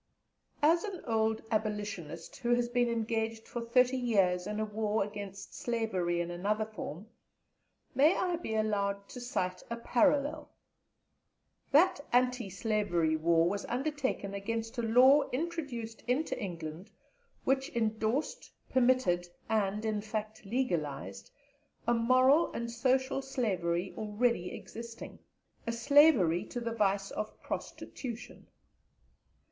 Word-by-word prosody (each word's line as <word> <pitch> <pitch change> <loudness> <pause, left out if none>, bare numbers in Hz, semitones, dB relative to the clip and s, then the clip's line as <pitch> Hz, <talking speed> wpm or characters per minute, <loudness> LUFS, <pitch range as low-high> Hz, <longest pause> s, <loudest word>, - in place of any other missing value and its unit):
As 330 +3 +5
an 395 -5 -5
old 220 -1 +1
Abolitionist, 205 -7 -3
who 240 0 +2
has 240 0 0
been 245 0 +2
engaged 225 -1 -2
for 240 - -4
thirty 250 +2 +3
years 195 -7 +2
in 210 0 -3
a 215 - 0
war 215 0 0
against 200 -1 -8
slavery 190 -8 -1
in 175 0 -2
another 205 +5 0
form, 195 -4 -7 0.9
may 300 +6 +5
I 355 -2 0
be 225 -10 -4
allowed 200 -2 0
to 250 - -8
cite 185 -7 -2
a 235 - -3
parallel? 290 +5 +1 1.2
That 325 +3 +5
Anti 250 -3 +2
slavery 190 -6 +1
War 165 +1 +3
was 200 +3 -2
undertaken 265 -6 -2
against 225 +4 -3
a - - +2
Law 255 +6 +5
introduced 260 -7 -4
into 265 +6 0
England, 170 -1 -6 0.5
which 270 +1 +1
endorsed, 220 +4 -1 0.2
permitted, 245 -9 +3 0.2
and 210 -1 0
in 215 -1 0
fact, 215 0 -5
legalized, 150 - -2 0.6
a 240 - +4
moral 255 +6 +4
and 235 0 -3
social 260 +3 +1
slavery 190 -10 -1
already 215 -3 0
existing 230 0 -9 0.5
a - - +1
slavery 235 - +5
to 245 - -5
the 230 -1 -3
vice 200 -2 +1
of 215 - -5
prostitution. 240 -3 -6
225 Hz, 120 wpm, -31 LUFS, 200-250 Hz, 1.2 s, As